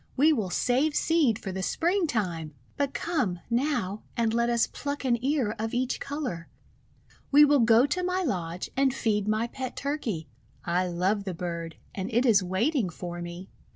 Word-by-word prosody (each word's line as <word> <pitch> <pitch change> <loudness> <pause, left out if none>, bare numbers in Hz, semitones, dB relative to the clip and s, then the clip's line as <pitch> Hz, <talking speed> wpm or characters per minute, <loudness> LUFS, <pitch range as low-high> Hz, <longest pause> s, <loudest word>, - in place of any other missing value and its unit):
We 305 +4 +5
will 215 -9 -1
save 265 +10 +1
seed 305 -10 +3
for 195 - -6
the 190 +1 -4
Springtime! 215 - 0 0.2
"But 280 -1 0
come, 255 - -1
now, 235 -6 0 0.2
and 230 -1 +1
let 235 +1 +2
us 235 -1 +3
pluck 285 -1 -5
an 240 -2 +1
ear 270 -6 +1
of 225 +2 -2
each 255 +1 0
colour. 275 - -4 0.8
We 295 +1 +8
will 290 -1 +4
go 230 +1 +6
to 350 +6 -1
my 365 +1 0
lodge 180 - -3
and 270 -1 +2
feed 210 -5 0
niy 215 +2 +1
pet 260 -2 -5
Turkey. 250 - -3 0.4
I 180 +1 +1
love 190 +4 0
the 185 -3 -3
bird, 170 -1 -4 0.2
and 190 +4 -4
it 240 +3 +2
is 215 -5 +5
waiting 200 - 0
for 175 +1 -6
me." 175 +2 -8
230 Hz, 175 wpm, -27 LUFS, 185-280 Hz, 0.8 s, We